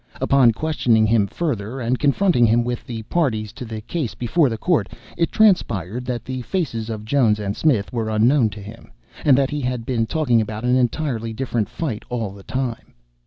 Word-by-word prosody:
Upon 135 -4 +4
questioning 115 -4 +1
him 110 -2 +3
further, 120 - -3
and 125 +1 -1
confronting 145 -3 +3
him 115 +2 +3
with 120 0 -4
the 115 -2 -5
parties 110 -7 -1
to 125 - -8
the 110 -1 -6
case 130 +2 -4
before 140 +4 +2
the 115 - -3
court, 175 +7 +1 0.3
it 170 - 0
transpired 125 - +2
that 120 -2 -4
the 130 0 -4
faces 115 - -3
of 110 -1 -5
Jones 115 -3 +3
and 100 -1 -3
Smith 125 -11 +1
were 115 -2 -2
unknown 115 +3 +3
to 105 0 -10
him, 105 - -12 0.3
and 140 -4 +5
that 135 -1 +1
he 145 0 -2
had 125 -2 -3
been 115 -3 0
talking 125 -7 +2
about 110 +1 -5
an 125 +1 +2
entirely 120 -2 -1
different 120 -3 -2
fight 130 -10 -4
all 115 -5 -3
the 100 0 -12
time.) 125 +2 -4
120 Hz, 195 wpm, -21 LUFS, 110-135 Hz, 0.3 s, and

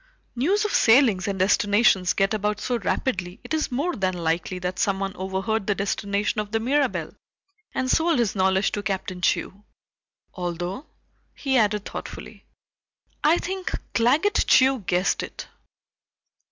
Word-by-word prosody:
"News 375 - +1
of 420 - -2
sailings 225 -5 +4
and 200 -1 -2
destinations 200 0 +3
get 195 +2 +1
about 210 -1 -1
so 245 +2 -1
rapidly, 185 -4 -2
it - - -6
is 310 -3 -1
more 295 +8 -1
than 185 -2 -1
likely 170 +2 -1
that 180 0 -4
someone 195 0 -1
overheard 190 +3 -2
the 205 - +1
destination 200 +1 -1
of 210 -1 -8
the 225 - +1
Mirabelle, 270 +4 0 0.6
and 260 - 0
sold 330 0 +2
his 235 -5 +1
knowledge 190 0 +2
to 205 - -3
Captain 190 -3 -4
Chew. 195 +3 -1 0.7
Although," 175 - -4 0.5
he 270 -2 -1
added 210 -3 +2
thoughtfully, - - -8 0.8
"I 315 +3 +5
think 375 +1 -4 0.2
Claggett 295 - +2
Chew 265 0 +5
guessed 180 +2 +1
it. - - -8
205 Hz, 140 wpm, -24 LUFS, 190-260 Hz, 0.8 s, I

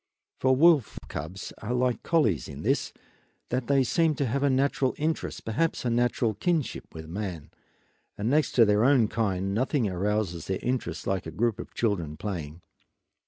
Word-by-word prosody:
For 130 0 +3
wolf 150 -4 +4
cubs 80 +6 -6
are 120 +3 -2
like 125 -1 +1
collies 110 - +1
in - - -8
this, - - +1 0.6
that 125 0 -1
they 140 -1 +4
seem 160 +4 +2
to 140 - 0
have 135 +3 -1
a 140 - +3
natural 135 0 +1
interest, 155 +2 -2
perhaps 130 +7 -1
a 120 - +1
natural 120 -1 +1
kinship 155 - -1
with 80 0 -8
man, 90 -3 -5 0.7
and 105 - -2
next 150 +4 +2
to 115 - +6
their 105 +1 +3
own 130 -4 +5
kind 95 -4 -1
nothing 125 +1 +1
arouses 95 -2 -1
their 95 - -1
interest 125 +1 -2
like 95 -3 -1
a - - -5
group 110 +5 0
of - - -9
children 85 -10 -1
playing. 85 -5 -5
115 Hz, 170 wpm, -27 LUFS, 95-130 Hz, 0.7 s, to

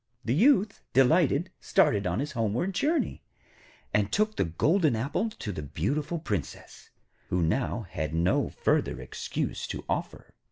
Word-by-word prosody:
The 115 - +1
Youth, 210 - +3
delighted, 150 +4 +3
started 100 -3 +2
on 90 +7 0
his 150 +1 -3
homeward 115 - -1
journey, 295 - 0 0.7
and 105 -1 +1
took 215 +1 +1
the - - +1
golden 150 - +2
apple 140 - -1
to 110 - -6
the 80 - -5
beautiful 140 - -2
Princess, 105 - -5 0.4
who 90 - 0
had 95 - -2
now 85 +3 +2
no - - +1
further - - 0
excuse - - -4
to - - -6
offer. - - -4
135 Hz, 145 wpm, -28 LUFS, -, 0.7 s, Youth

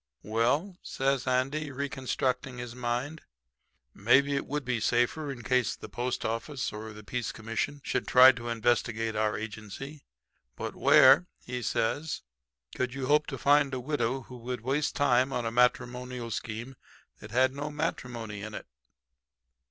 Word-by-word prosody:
"'Well,' 135 - 0
says 135 -1 -1
Andy, 135 +4 0
reconstructing 130 -2 -2
his 120 -1 -6
mind, 125 +5 -3 0.7
'maybe 135 +7 +4
it 140 - -2
would 145 -1 -3
be 125 -2 0
safer 120 +7 +1
in 120 -3 -8
case 130 -1 +1
the - - -10
post 125 +1 -3
office 130 +5 -3
or 110 +1 -7
the 105 0 -11
peace 120 +1 -3
commission 115 +6 -3
should - - -2
try 130 +1 +9
to 120 -2 -7
investigate 115 -1 0
our 110 0 +1
agency. 110 +7 -7 0.5
But - - -5
where,' 170 +7 +7 0.2
he 125 0 -4
says, 145 +7 -1 0.5
'could 125 0 -2
you 135 -1 -3
hope 150 +2 +3
to - - -4
find 140 -1 +3
a - - -3
widow 130 -1 -1
who 125 0 -11
would 125 0 -5
waste 140 +5 0
time 130 -2 +3
on 120 -3 -2
a 115 - -1
matrimonial 125 0 0
scheme 115 +4 -5 0.4
that 105 - -10
had 130 +3 +3
no 145 +2 -4
matrimony 120 -9 -4
in 110 +1 -6
it?' - - -7
125 Hz, 155 wpm, -29 LUFS, 115-140 Hz, 0.7 s, try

